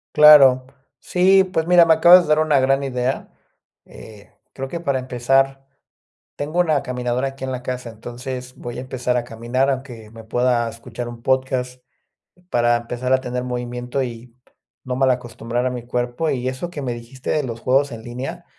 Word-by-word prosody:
Claro. 140 Hz, -4 st, +8 dB, 0.3 s
Sí, 190 Hz, +2 st, +4 dB
pues 180 Hz, -4 st, -2 dB
mira, 175 Hz, -1 st, +7 dB
me 165 Hz, -, +5 dB
acabas 175 Hz, +3 st, +7 dB
de -, -, -8 dB
dar 155 Hz, 0 st, +4 dB
una 155 Hz, -3 st, +3 dB
gran 135 Hz, +1 st, +2 dB
idea, 125 Hz, 0 st, -2 dB, 0.5 s
eh, 105 Hz, -2 st, -14 dB, 0.2 s
creo 135 Hz, 0 st, -5 dB
que 170 Hz, +5 st, -5 dB
para 140 Hz, -6 st, -1 dB
empezar 135 Hz, +2 st, 0 dB, 0.7 s
tengo 155 Hz, +5 st, -3 dB
una 155 Hz, -5 st, +2 dB
caminadora 125 Hz, +1 st, -2 dB
aquí 135 Hz, 0 st, -11 dB
en 130 Hz, -, -3 dB
la 125 Hz, -1 st, -5 dB
casa. 125 Hz, -1 st, -5 dB
Entonces 125 Hz, +3 st, -8 dB
voy 120 Hz, 0 st, -7 dB
a -, -, -4 dB
empezar 125 Hz, -1 st, -2 dB
a 120 Hz, -, -1 dB
caminar, 120 Hz, +4 st, -1 dB
aunque 125 Hz, -5 st, -5 dB
me 115 Hz, -1 st, -12 dB
pueda 120 Hz, +1 st, +1 dB
escuchar 115 Hz, +1 st, -8 dB
un 120 Hz, -1 st, -10 dB
podcast, 130 Hz, -1 st, -1 dB, 0.7 s
para 120 Hz, 0 st, +2 dB
empezar 120 Hz, +2 st, -4 dB
a 130 Hz, -, +4 dB
tener 125 Hz, -1 st, -4 dB
movimiento 125 Hz, +1 st, -4 dB
y 120 Hz, -1 st, -8 dB, 0.5 s
no 125 Hz, -1 st, -3 dB
mal 135 Hz, 0 st, +2 dB
acostumbrar 120 Hz, 0 st, -3 dB
a -, -, +1 dB
mi 120 Hz, -1 st, -6 dB
cuerpo. 125 Hz, +6 st, -2 dB
Y 130 Hz, -2 st, -2 dB
eso 130 Hz, +7 st, -4 dB
que 155 Hz, -4 st, -7 dB
me 125 Hz, -3 st, -3 dB
dijiste 120 Hz, +2 st, -7 dB
de 150 Hz, -, +1 dB
los 115 Hz, -3 st, -5 dB
juegos 135 Hz, +3 st, +1 dB
en 115 Hz, -1 st, -8 dB
línea, 125 Hz, +3 st, -7 dB
125 Hz, 185 wpm, -21 LUFS, 120-135 Hz, 0.7 s, Claro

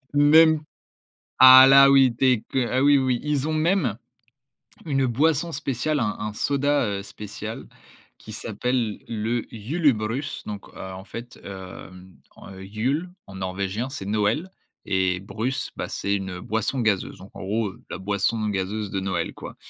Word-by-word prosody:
Même 155 Hz, +2 st, +6 dB, 0.8 s
ah 130 Hz, 0 st, +10 dB
là 135 Hz, 0 st, +8 dB
oui, 135 Hz, -2 st, +6 dB
dès 125 Hz, -1 st, +2 dB
que 130 Hz, -3 st, 0 dB
ah 130 Hz, +1 st, +1 dB
oui 145 Hz, 0 st, +5 dB
oui, 130 Hz, -2 st, 0 dB
ils 150 Hz, -1 st, -1 dB
ont -, -, -1 dB
même 155 Hz, -, +1 dB, 0.9 s
une 135 Hz, -3 st, +1 dB
boisson 155 Hz, +6 st, +1 dB
spéciale, 145 Hz, +1 st, -2 dB
un 105 Hz, -3 st, -1 dB
un 105 Hz, 0 st, -4 dB
soda, 140 Hz, +3 st, +1 dB
heu, 100 Hz, -1 st, -3 dB
spécial 105 Hz, +2 st, -8 dB, 0.5 s
qui 110 Hz, -, -12 dB
s'appelle 115 Hz, +1 st, -2 dB
le 115 Hz, +1 st, -2 dB
Julebrus, 125 Hz, 0 st, -1 dB
donc, 105 Hz, -2 st, -7 dB
heu, -, -, -9 dB
en 95 Hz, 0 st, -8 dB
fait, 115 Hz, +1 st, -9 dB
heu 95 Hz, -2 st, -9 dB, 0.6 s
heu, 95 Hz, 0 st, -10 dB
Jul 130 Hz, -, -2 dB, 0.2 s
en 95 Hz, -, -11 dB
norvégien 95 Hz, +5 st, -3 dB
c'est 135 Hz, -8 st, -7 dB
Noël 110 Hz, -, 0 dB, 0.4 s
et 95 Hz, -1 st, 0 dB
brus, 110 Hz, +7 st, -4 dB
bah, -, -, -4 dB
c'est 100 Hz, 0 st, -2 dB
une 95 Hz, -2 st, -5 dB
boisson 110 Hz, +7 st, -2 dB
gazeuse, 105 Hz, -7 st, -1 dB
donc 95 Hz, -, -12 dB
en -, -, -8 dB
gros, 105 Hz, +2 st, -1 dB
heu, -, -, -15 dB
la -, -, -5 dB
boisson 105 Hz, +3 st, -1 dB
gazeuse 100 Hz, +1 st, -3 dB
de 95 Hz, -, -2 dB
Noël 95 Hz, 0 st, -2 dB
quoi -, -, -9 dB
115 Hz, 160 wpm, -24 LUFS, 100-135 Hz, 0.9 s, ah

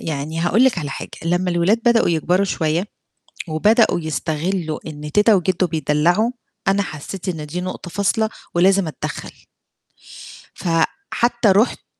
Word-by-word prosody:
يعني 155 Hz, +1 st, -4 dB
هاقول 195 Hz, +8 st, +3 dB
لِك 260 Hz, -8 st, +3 dB
على 145 Hz, -4 st, -4 dB
حاجة -, -, -6 dB
لمّا 175 Hz, +2 st, +1 dB
الأولاد 175 Hz, +6 st, +2 dB
بدأوا 235 Hz, -1 st, +4 dB
يكبروا 175 Hz, +4 st, +2 dB
شوية 165 Hz, +1 st, -1 dB, 0.6 s
وبدأوا 210 Hz, +5 st, +3 dB
يستغلوا 160 Hz, +1 st, -2 dB
إن 150 Hz, -1 st, -7 dB
تيتة 210 Hz, +3 st, +5 dB
وجده 185 Hz, 0 st, +1 dB
بيدلعوا، 165 Hz, -, +1 dB, 0.4 s
أنا 200 Hz, +1 st, +3 dB
حسيت 185 Hz, +3 st, -7 dB
إن 160 Hz, -4 st, -3 dB
دي 170 Hz, +4 st, -4 dB
نقطة 185 Hz, 0 st, -6 dB
فاصلة 220 Hz, +4 st, +1 dB, 0.3 s
ولازم 190 Hz, +2 st, +3 dB
أتدخل. 155 Hz, -, -7 dB, 1.1 s
فحتى 235 Hz, -, 0 dB
رُحت 210 Hz, +6 st, +2 dB
امم. -, -, -44 dB
175 Hz, 135 wpm, -20 LUFS, 160-200 Hz, 1.1 s, تيتة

